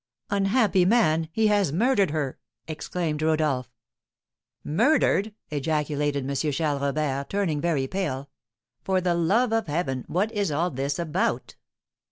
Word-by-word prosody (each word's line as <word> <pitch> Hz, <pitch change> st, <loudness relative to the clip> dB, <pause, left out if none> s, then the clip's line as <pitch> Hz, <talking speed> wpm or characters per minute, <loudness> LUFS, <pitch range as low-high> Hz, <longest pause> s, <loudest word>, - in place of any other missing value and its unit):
"Unhappy 200 Hz, -1 st, +3 dB
man! 165 Hz, -6 st, +3 dB
He 220 Hz, +5 st, +1 dB
has 205 Hz, -7 st, +3 dB
murdered 205 Hz, -, +2 dB
her!" 145 Hz, -3 st, -3 dB, 0.3 s
exclaimed 155 Hz, -1 st, -3 dB
Rodolph. 155 Hz, -6 st, +1 dB, 0.9 s
"Murdered!" 215 Hz, -, +2 dB, 0.2 s
ejaculated 145 Hz, -2 st, -1 dB
M. 140 Hz, -, -2 dB, 0.2 s
Charles 145 Hz, -1 st, -1 dB
Robert, 140 Hz, -1 st, -1 dB
turning 185 Hz, -7 st, -1 dB
very 160 Hz, -6 st, +1 dB
pale; 140 Hz, -5 st, -3 dB, 0.5 s
"for 190 Hz, -1 st, +1 dB
the 180 Hz, -1 st, +1 dB
love 210 Hz, +8 st, +2 dB
of 225 Hz, -4 st, 0 dB
Heaven, 145 Hz, -5 st, -2 dB
what 200 Hz, +6 st, 0 dB
is 205 Hz, -6 st, -1 dB
all 170 Hz, +5 st, 0 dB
this 140 Hz, +1 st, -2 dB
about?" 170 Hz, +1 st, -1 dB
160 Hz, 130 wpm, -25 LUFS, 145-195 Hz, 0.9 s, Unhappy